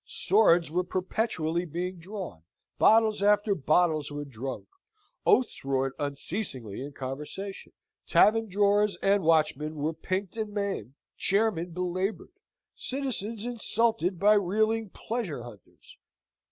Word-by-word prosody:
Swords 175 -5 +3
were 180 +2 +1
perpetually 180 -2 -1
being 180 +2 -4
drawn; 180 - -7 0.4
bottles 220 -2 +5
after 205 0 +3
bottles 155 -2 +2
were 145 0 -5
drunk; 130 0 -6 0.6
oaths 255 - +3
roared 135 0 0
unceasingly 140 - -4
in 140 +2 -6
conversation; 150 +9 -6 0.4
tavern 225 0 +4
drawers 205 0 +2
and 200 +1 +4
watchmen 155 -2 +2
were 155 +2 -1
pinked 185 +5 -3
and 215 -2 -3
maimed; 200 - -3 0.2
chairmen 195 -4 +1
belaboured; 180 +3 -3 0.4
citizens 230 -5 -4
insulted 225 -6 0
by 205 +4 +5
reeling 215 +2 +1
pleasure 185 - -4
hunters. 110 -6 -14
185 Hz, 115 wpm, -28 LUFS, 155-210 Hz, 0.6 s, bottles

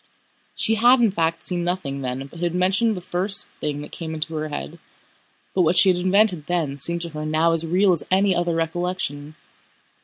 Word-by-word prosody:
She 225 - +1
had 240 +4 +5
in 230 -4 +3
fact 165 -2 -1
seen 175 -2 -1
nothing 170 -6 -3
then 130 +1 -4
but 165 +4 -13
had 175 0 -2
mentioned 195 +4 +1
the - - -6
first 185 +3 +2
thing 145 -1 -3
that 150 - -10
came 160 -2 -6
into 160 +1 -3
her 155 0 -3
head, 155 +2 -7 0.7
but 185 - +1
what 175 +1 +2
she 190 - +6
had 180 - +2
invented 185 -3 +2
then 155 -6 -2
seemed 170 +4 +2
to 170 - -2
her 155 -1 -7
now 155 +2 +1
as 165 0 0
real 185 +4 +3
as 170 - +1
any 190 0 +2
other 175 -1 -1
recollection. 165 -3 -3
170 Hz, 205 wpm, -22 LUFS, 155-185 Hz, 0.7 s, she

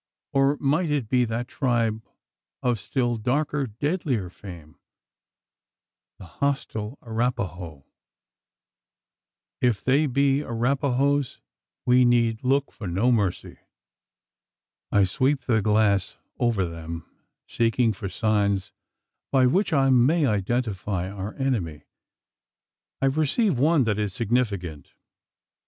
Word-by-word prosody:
Or 140 +1 +3
might 150 +5 +1
it 140 -7 -1
be 125 -1 +3
that 115 +2 -3
tribe 115 -5 0 0.6
of 120 -3 +1
still 120 +2 -1
darker, 140 +4 -1
deadlier 120 - -2
fame 85 -6 -12 1.4
the - - -11
hostile 115 - -3
Arapaho? 90 - -3 1.8
If 120 -5 +1
they 140 +4 +3
be 140 +1 +2
Arapahoes, 140 +2 0 0.5
we 125 +1 +5
need 115 -2 +2
look 135 +2 +1
for 105 - -8
no 100 +9 +1
mercy. 100 -6 -1 1.3
I 100 - +4
sweep 130 +9 +1
the 115 -3 +1
glass 105 -2 +2 0.2
over 115 -6 +1
them, 85 -1 -7 0.4
seeking 115 0 +1
for 100 -1 -6
signs 100 -1 0 0.6
by 130 -2 +4
which 185 +11 +2
I 135 -3 +3
may 140 +6 +4
identify 100 -4 -1
our 100 +1 -6
enemy. 110 - -2 1.2
I 135 - +4
perceive 155 - +1
one 150 +1 +4
that 105 -3 0
is 105 -3 -2
significant. 100 - -2
120 Hz, 110 wpm, -25 LUFS, 100-135 Hz, 1.8 s, we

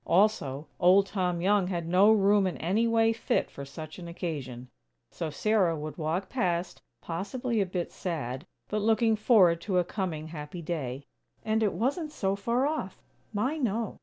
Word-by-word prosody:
Also, 160 -7 +2
Old 190 +3 +6
Tom 180 -4 -1
Young 195 0 +3
had 170 -3 -3
no 190 +5 +5
room 200 -2 +4
in 180 - -3
any 205 +8 +1
way 225 0 +3
fit 225 - -1
for 140 - -8
such 155 +4 -9
an 170 - -8
occasion. 140 -8 -5 0.4
So 165 -2 -4
Sarah 185 +2 +2
would 150 0 -6
walk 165 +5 -1
past, 180 -8 -1 0.2
possibly 210 +7 -2
a 195 - 0
bit 180 -1 -3
sad, 150 -4 -4 0.2
but 210 0 -1
looking 225 +1 +3
forward 195 -7 +4
to 190 0 -1
a 180 - +4
coming 170 -4 -4
happy 160 +2 -7
day. 140 -5 -4 0.4
And 220 0 +1
it 210 -3 +2
wasn't 290 +6 -1
so 195 -8 -1
far 235 +6 0
off. 290 -11 -3 0.3
My, 255 +9 -1
no! 225 -4 -2
185 Hz, 170 wpm, -28 LUFS, 165-215 Hz, 0.4 s, Old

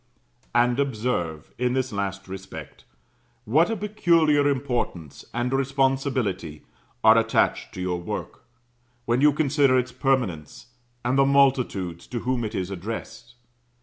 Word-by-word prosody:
And 120 +2 +3
observe, 110 - -2
in 125 0 +1
this 130 -2 -1
last 100 -1 -3
respect, 95 -6 -9 0.6
what 155 - +3
a 225 - -1
peculiar 165 -8 +3
importance, 125 - -3
and 120 +2 -2
responsibility, 130 - 0 0.4
are - - +7
attached - - +1
to 90 - -5
your 90 -1 -2
work, - - -6 0.6
when 120 +2 +1
you 150 +1 +6
consider 140 -3 +3
its 125 0 -1
permanence, 125 - -2 0.3
and 130 +3 +2
the 135 - +6
multitudes 125 -11 +1
to 120 -2 -4
whom 125 -1 -1
it 110 0 -4
is 95 0 -3
addressed. 115 +4 -7
125 Hz, 130 wpm, -25 LUFS, 95-135 Hz, 0.6 s, are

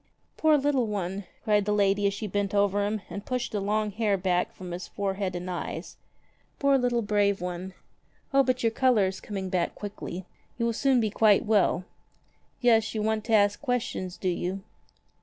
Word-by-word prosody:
"Poor 310 -1 +4
little 275 -4 +1
one!" 195 -1 -3 0.2
cried 210 -2 +2
the 210 - 0
lady 200 0 +3
as 200 - 0
she 215 - -4
bent 205 0 -1
over 200 0 +2
him 210 -1 -3
and 200 - -6
pushed 250 +1 -2
the 210 - -1
long 210 +1 0
hair 210 -1 +1
back 180 -1 0
from 180 -1 -9
his 175 +1 -5
forehead 195 -2 -2
and 175 +1 -5
eyes. 180 -1 -5 0.6
"Poor 280 -1 +3
little 245 -3 +1
brave 205 -1 +2
one! 180 +1 -5 0.6
O 275 - +6
but 255 -2 0
your 225 - +3
color 240 -4 +3
is 190 0 -3
coming 195 -2 -4
back 180 -2 -1
quickly. 195 -3 -6 0.3
You 235 - 0
will 230 - +1
soon 265 +2 +3
be 215 -2 0
quite 215 -1 +4
well. 200 -4 +2 0.8
Yes, 225 -3 +3
you 215 - -1
want 220 0 0
to 225 - -1
ask 205 -1 +4
questions, 235 -9 -2
do 185 - -1
you 180 +2 -3
205 Hz, 190 wpm, -27 LUFS, 190-225 Hz, 0.8 s, O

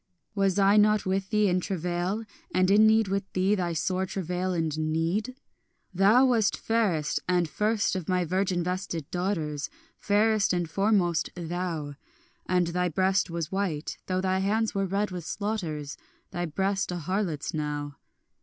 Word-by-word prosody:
Was 195 -2 +1
I 200 +1 +5
not 210 0 +4
with 190 0 -1
thee 210 -1 +3
in 180 -1 +2
travail, 180 +3 -2 0.3
and 185 +1 +3
in 215 +2 +6
need 220 -1 +4
with 195 0 -2
thee, 190 +2 +2
Thy 175 -4 -1
sore 185 +3 -1
travail 185 0 -2
and 160 -4 -1
need? 165 +10 -1 0.6
Thou 205 +8 +5
wast 225 -5 +2
fairest 200 -10 0
and 175 -2 +2
first 210 +6 0
of 185 -3 -4
my 180 -1 +1
virgin 185 0 0
vested 180 -3 -3
daughters, 165 -6 -2 0.3
Fairest 210 -1 +2
and 175 -1 0
foremost 190 -2 +1
thou; 170 -3 -4 0.5
And 180 -1 +2
thy 180 +1 0
breast 190 +3 +1
was 170 -2 -4
white, 190 -6 -2
though 185 0 0
thy 190 0 +1
hands 215 +3 0
were 195 -1 0
red 200 +2 -1
with 180 -2 -5
slaughters, 170 -8 -4 0.3
Thy 175 0 -2
breast, 195 +4 -1
a 180 - -3
harlot's 175 -2 -2
now. 145 -2 -3
185 Hz, 155 wpm, -27 LUFS, 170-200 Hz, 0.6 s, in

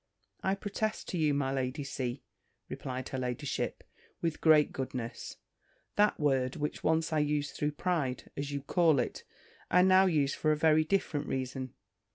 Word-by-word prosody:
"I 190 +1 +1
protest 210 +2 -3
to 180 - -2
you, 150 -2 +2
my 135 -2 0
Lady 130 +2 -2
C.," 130 -1 -4 0.5
replied 130 0 -5
her 130 - -3
ladyship, 125 -1 -3 0.4
with 165 -2 -2
great 155 -2 +5
goodness, 125 -3 -5 0.6
"that 210 0 +3
word, 135 -3 +1
which 150 -1 -3
once 160 0 +1
I 155 - +3
used 150 -1 0
through 150 0 -1
pride, 150 -6 -2
as 140 0 -3
you'll 140 -1 -3
call 165 -1 +3
it, 125 - -2 0.5
I 180 - +5
now 190 +1 +6
use 145 -5 +2
for 155 - +1
a 155 - +2
very 155 0 +4
different 155 -4 -1
reason. 130 -1 -4
150 Hz, 165 wpm, -31 LUFS, 130-160 Hz, 0.6 s, now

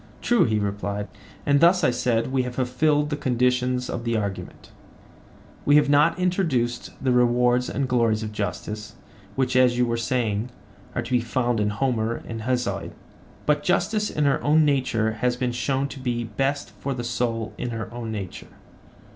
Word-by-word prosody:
True, 240 -1 +3
he 110 -2 +1
replied. 100 0 -3 0.4
And 140 0 +4
thus, 175 +3 +5
I - - +4
said, 120 0 0
we 135 -1 +2
have 125 -1 -5
fulfilled 145 +4 +1
the - - +1
conditions 125 -1 +1
of 120 - -4
the 115 -1 0
argument; 100 -3 -5 0.9
we 145 - +4
have 145 -1 +5
not 150 +3 +4
introduced 135 - 0
the 130 - +1
rewards 125 0 +3
and 140 -1 -1
glories 115 -3 +2
of 105 - -4
justice, 105 0 -5 0.4
which, 130 -1 0
as 125 -1 +4
you 125 - +3
were 115 0 -1
saying, 115 -2 -1 0.5
are 120 - -1
to 115 - -9
be 125 - +4
found 120 0 0
in 105 0 +1
Homer 115 0 0
and 115 -1 -5
Hesiod; 125 -1 -1 0.5
but 150 -1 +2
justice 210 +5 +1
in 150 - 0
her 140 -1 +1
own 155 +1 +4
nature 125 -6 +1
has 120 +3 0
been 125 0 -1
shown 135 +3 -1
to 135 - -8
be 120 -2 -2
best 135 +6 -2
for 140 -1 -3
the 120 - -4
soul 120 -2 -2
in 125 - -2
her 115 -1 -4
own 120 -2 -5
nature. 100 -4 -6
125 Hz, 180 wpm, -24 LUFS, 115-135 Hz, 0.9 s, thus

